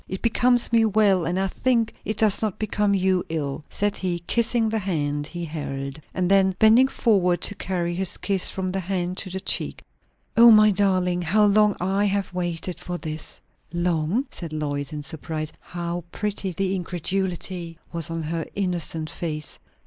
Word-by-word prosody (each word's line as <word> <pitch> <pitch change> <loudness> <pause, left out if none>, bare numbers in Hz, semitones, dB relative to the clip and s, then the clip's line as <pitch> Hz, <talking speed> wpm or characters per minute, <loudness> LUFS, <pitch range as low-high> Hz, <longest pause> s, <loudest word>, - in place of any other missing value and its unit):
It 190 - -6
becomes 240 +1 +3
me 230 -1 +5
well, 205 -5 +3
and 175 +2 -1
I 195 - +1
think 230 +3 0
it 215 +1 -3
does 215 -3 +3
not 215 -4 -1
become 210 -1 0
you 185 -1 +2
ill," 150 -2 -3
said 205 0 -1
he, 180 -2 -2
kissing 235 +1 +2
the 220 0 0
hand 145 -6 -2
he 175 +1 -5
held. 140 -2 -5
And 185 -1 -1
then, 190 -1 +4
bending 225 +5 +6
forward 190 -9 +2
to - - +4
carry 175 -3 -2
his 185 +1 0
kiss 195 -2 +1
from 185 -1 -3
the 195 - -2
hand 180 -1 -2
to 185 - -3
the 190 +1 -4
cheek, - - +1 0.5
"O 235 +1 +9
my 215 -1 +7
darling, 185 -3 +1
how 210 +5 +3
long 210 0 +4
I 195 +3 +1
have 200 -2 -1
waited 175 0 -3
for 175 0 -5
this!" 155 -2 -4 0.3
"Long?" 175 - 0
said 165 -3 -7
Lois, 145 -1 -3
in 150 -1 -5
surprise. 155 +1 -4
How 175 0 -5
pretty 205 -2 -3
the 190 +2 -1
incredulity 180 -1 -2 0.2
was 165 -2 0
on 165 -1 -3
her 160 +1 -3
innocent 175 -4 -2
face. 155 -2 -5
185 Hz, 175 wpm, -24 LUFS, 165-205 Hz, 0.5 s, O